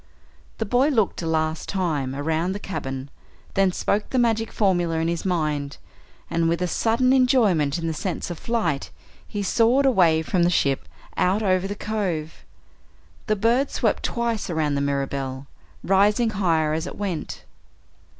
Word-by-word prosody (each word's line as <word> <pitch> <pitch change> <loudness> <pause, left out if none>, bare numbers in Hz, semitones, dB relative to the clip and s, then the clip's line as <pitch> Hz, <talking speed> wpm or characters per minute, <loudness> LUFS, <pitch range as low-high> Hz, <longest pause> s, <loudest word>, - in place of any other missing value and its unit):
The 225 - -2
boy 245 +6 +3
looked 225 -12 +1
a 165 - -3
last 160 0 -1
time 150 -9 -1
around 160 +5 -1
the 200 - -5
cabin, 135 -8 -5 0.4
then 195 -1 +3
spoke 205 +3 -1
the 260 - -1
magic 225 -2 +1
formula 175 -5 +1
in 165 0 0
his 170 +1 -2
mind, 150 -6 -1 0.5
and, 165 0 +1
with 170 0 0
a 180 - 0
sudden 235 +8 +2
enjoyment 215 - +3
in 165 - -4
the 165 - -1
sense 175 +2 -4
of 170 - -6
flight, 175 -12 -1 0.4
he 205 -2 -4
soared 235 +7 +3
away 170 -11 +4
from 180 +2 0
the 170 - +4
ship 140 -6 +1 0.3
out 195 +4 +2
over 185 -1 +2
the 205 - -4
cove. 190 -8 -3 0.8
The 215 - +2
bird 235 +7 +2
swept - - 0
twice 235 -4 -2
around 155 -3 0
the 140 - 0
Mirabelle, 140 -1 -2 0.4
rising 210 +4 +3
higher 165 -6 +1
as 160 +3 -2
it - - -8
went. 195 -6 -4
180 Hz, 160 wpm, -23 LUFS, 160-215 Hz, 0.8 s, away